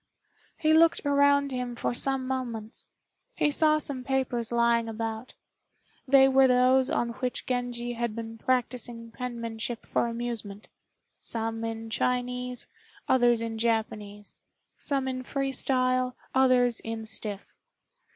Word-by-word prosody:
He 310 -1 +3
looked 325 -1 +4
around 285 0 +3
him 250 -1 -3
for 240 - -1
some 265 +1 0
moments. 240 -4 -4 0.5
He 295 - +2
saw 305 +1 +4
some 280 -4 -3
papers 250 -3 -1
lying 235 -1 +2
about. 225 +2 -5 0.7
They 270 0 +7
were 270 0 +5
those 255 +1 +4
on 235 - 0
which 250 -1 -3
Genji 245 -1 -2
had 235 -2 -3
been 225 -1 -7
practising 240 -2 -2
penmanship 235 -1 -5
for - - 0
amusement 230 -3 -5 0.5
some 225 0 -2
in 225 0 -5
Chinese, 250 0 -1 0.4
others 240 -3 +3
in 225 -1 -4
Japanese; 215 -3 -2 0.4
some 275 -2 -1
in 255 -1 -3
free 275 +1 -2
style, 255 -1 +1 0.2
others 250 -3 +4
in 225 0 -5
stiff. 210 -2 -5
245 Hz, 125 wpm, -28 LUFS, 230-260 Hz, 0.7 s, They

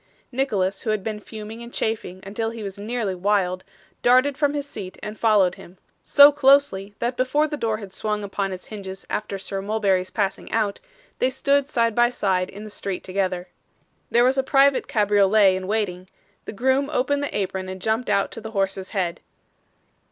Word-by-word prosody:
Nicholas, 205 -8 0
who 225 - -3
had 215 -2 0
been 215 0 -3
fuming 215 +1 -9
and 235 0 -9
chafing 200 -4 -2
until 220 +3 -2
he 225 -1 -7
was 200 0 -6
nearly 215 -2 -2
wild, 185 -1 0 0.4
darted 255 +3 +4
from 290 0 +1
his 285 -1 -3
seat, 195 -8 -8
and 210 0 -6
followed 205 -5 +4
him: 180 +2 -14 0.2
so 285 +1 +8
closely, 270 -8 +3
that 240 +1 -2
before 260 +4 +2
the 300 - -3
door 225 -6 -1
had 200 -3 -10
swung 210 +1 -2
upon 195 -1 -2
its 185 -1 -7
hinges 190 -3 -8
after 210 -2 -2
Sir 195 0 -4
Mulberry's 195 -3 0
passing 200 -3 -2
out, 215 -3 0 0.4
they 255 - +3
stood 280 +1 +1
side 230 -5 +1
by 240 +2 +4
side 190 -6 0
in 205 +2 -9
the 215 - -9
street 195 -2 -4
together. 185 -1 -2 0.6
There 240 - +4
was 260 +2 +3
a - - +5
private 275 0 +3
cabriolet 205 -2 +4
in 185 0 -4
waiting; 190 -4 -2 0.4
the - - -5
groom 265 +5 +1
opened 285 +1 +1
the 285 - -3
apron, 190 -1 -3
and 190 0 -6
jumped 220 +5 -1
out 200 - +1
to 225 - -7
the 220 - -7
horse's 195 -1 -1
head. 185 -4 -2
210 Hz, 190 wpm, -23 LUFS, 195-245 Hz, 0.6 s, so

